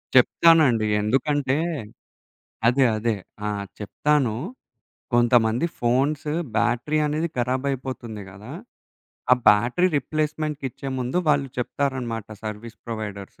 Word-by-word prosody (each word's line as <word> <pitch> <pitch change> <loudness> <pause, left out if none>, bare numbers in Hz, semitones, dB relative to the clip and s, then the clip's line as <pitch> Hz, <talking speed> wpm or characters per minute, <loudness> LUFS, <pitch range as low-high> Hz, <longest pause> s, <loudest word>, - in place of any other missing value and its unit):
చెప్తానండి. 130 -3 +5 0.2
ఎందుకంటే 135 +5 +1 1.1
అదే, 130 +2 +4
అదే. 110 0 0 0.3
ఆ! - - 0 0.3
చెప్తాను. 130 +3 +1 0.8
కొంతమంది 120 +1 +3
ఫోన్స్ 135 +5 +1 0.3
బ్యాటరీ 120 +6 +1
అనేది 155 +3 -1
ఖరాబయిపోతుంది 130 -3 -2
కదా! 100 +3 -11 0.8
ఆ - - +10
బ్యాటరీ 120 - +4
రిప్లేస్మెంట్‌కిచ్చే 150 -2 -3
ముందు 125 +7 -1
వాళ్ళు 140 -2 +2
చెప్తారనమాట, 125 -4 -2 0.2
సర్వీస్ 110 +2 -6
ప్రొవైడర్స్. 105 -4 -6
125 Hz, 90 wpm, -24 LUFS, 115-145 Hz, 1.1 s, ఆ